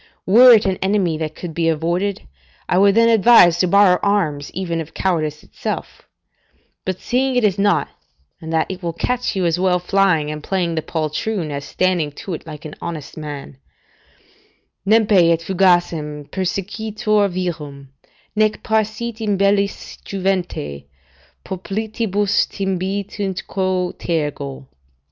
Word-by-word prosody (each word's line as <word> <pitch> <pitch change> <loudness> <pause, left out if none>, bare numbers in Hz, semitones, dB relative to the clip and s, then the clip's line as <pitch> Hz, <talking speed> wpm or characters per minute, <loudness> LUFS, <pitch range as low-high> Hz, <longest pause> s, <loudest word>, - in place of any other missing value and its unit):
Were 245 +6 +8
it 220 -2 +6
an 190 -1 0
enemy 190 -4 +1
that 155 -1 -4
could 175 -3 -7
be 165 0 +1
avoided, 175 +6 -1 0.4
I 180 - +2
would 200 0 +5
then 230 0 +5
advise 220 -6 +6
to 185 - +3
borrow 190 -1 +5
arms 165 -9 0
even 170 -3 -3
of 160 0 -10
cowardice 155 -5 -1
itself; - - -6 0.8
but 185 -1 -2
seeing 260 +1 0
it 245 - +2
is 200 -2 +2
not, 205 0 +2 0.5
and 160 0 -7
that 160 -1 +2
it 190 0 -7
will 170 -2 -3
catch 250 +8 -2
you 190 -2 0
as 170 +1 +1
well 185 -1 +3
flying 180 -4 +1
and 150 -1 -7
playing 180 -2 -1
the 160 - -1
poltroon, 160 +3 -3
as 140 0 -5
standing 180 -5 0
to't 175 -3 -7
like 150 -1 -9
an 155 - -7
honest 165 -4 -6
man: 145 -3 -7 1.3
"Nempe 205 -5 +5
et 165 0 +1
fugacem 170 -6 +1
persequitur 205 +3 -1
virum, 155 -7 -5 0.5
Nec 215 0 +1
parcit 220 +1 -1
imbellis 200 -2 0
juventae 180 - -3 0.6
Poplitibus 205 +1 -1
timidoque 190 -1 -2
tergo." 145 -4 -3
185 Hz, 135 wpm, -19 LUFS, 160-205 Hz, 1.3 s, Were